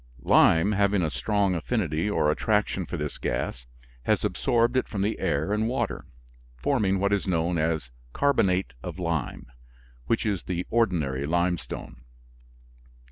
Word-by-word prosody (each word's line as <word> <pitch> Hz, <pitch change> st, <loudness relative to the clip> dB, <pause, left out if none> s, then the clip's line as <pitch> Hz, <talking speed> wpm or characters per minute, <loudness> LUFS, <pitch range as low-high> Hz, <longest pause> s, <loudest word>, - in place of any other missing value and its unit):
Lime, 80 Hz, +5 st, +5 dB
having 100 Hz, -2 st, +2 dB
a 80 Hz, -, -1 dB
strong 95 Hz, +9 st, +1 dB
affinity 85 Hz, -1 st, -1 dB
or 75 Hz, -7 st, +2 dB
attraction 105 Hz, -1 st, 0 dB
for 85 Hz, -, -4 dB
this 75 Hz, -1 st, -4 dB
gas, -, -, -3 dB, 0.4 s
has -, -, +2 dB
absorbed 120 Hz, -1 st, +1 dB
it 130 Hz, -, +1 dB
from 100 Hz, -2 st, -2 dB
the 105 Hz, +2 st, -1 dB
air 80 Hz, +6 st, 0 dB
and 110 Hz, +1 st, +1 dB
water, 130 Hz, +3 st, -2 dB, 0.5 s
forming 100 Hz, -, +1 dB
what 100 Hz, +1 st, +1 dB
is 100 Hz, -1 st, 0 dB
known 85 Hz, -1 st, +1 dB
as 80 Hz, -5 st, -1 dB, 0.2 s
carbonate 95 Hz, -, +1 dB
of -, -, -6 dB
lime 85 Hz, -6 st, -2 dB, 0.6 s
which 115 Hz, -, +1 dB
is 100 Hz, -6 st, -1 dB
the 90 Hz, -1 st, -2 dB
ordinary 80 Hz, -, +1 dB
limestone. 85 Hz, -7 st, -2 dB
90 Hz, 140 wpm, -26 LUFS, 80-105 Hz, 0.6 s, Lime